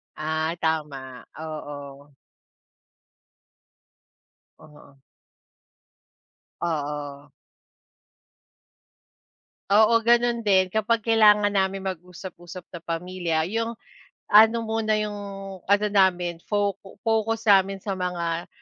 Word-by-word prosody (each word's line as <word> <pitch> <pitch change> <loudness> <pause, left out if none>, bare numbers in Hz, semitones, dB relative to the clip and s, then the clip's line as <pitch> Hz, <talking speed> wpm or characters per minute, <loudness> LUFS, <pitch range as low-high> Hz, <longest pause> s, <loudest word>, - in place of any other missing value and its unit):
Ah, 155 +1 -2
tama. 140 -5 -3
Oo. 145 -2 -8 2.4
Oo. 145 -2 -18 1.6
Oo. 145 -3 -4 2.4
Oo, 220 +3 +5
gano'n 235 +1 +3
din 190 -2 +3
kapag 220 +1 0
kailangan 210 -2 +5
namin 195 -1 0
mag-usap-usap 180 -1 -8
na 170 - -7
pamilya 170 -1 -2
yung, 230 +1 -2 0.6
ano 225 +2 +6
muna 220 -1 0
yung 210 -1 -3 0.5
ano 205 +1 +3
namin 180 -4 +2
focu 200 -2 -2
focus 225 0 0
namin 195 0 +3
sa 200 - -3
mga 175 -2 -3
185 Hz, 80 wpm, -24 LUFS, 160-210 Hz, 2.4 s, ano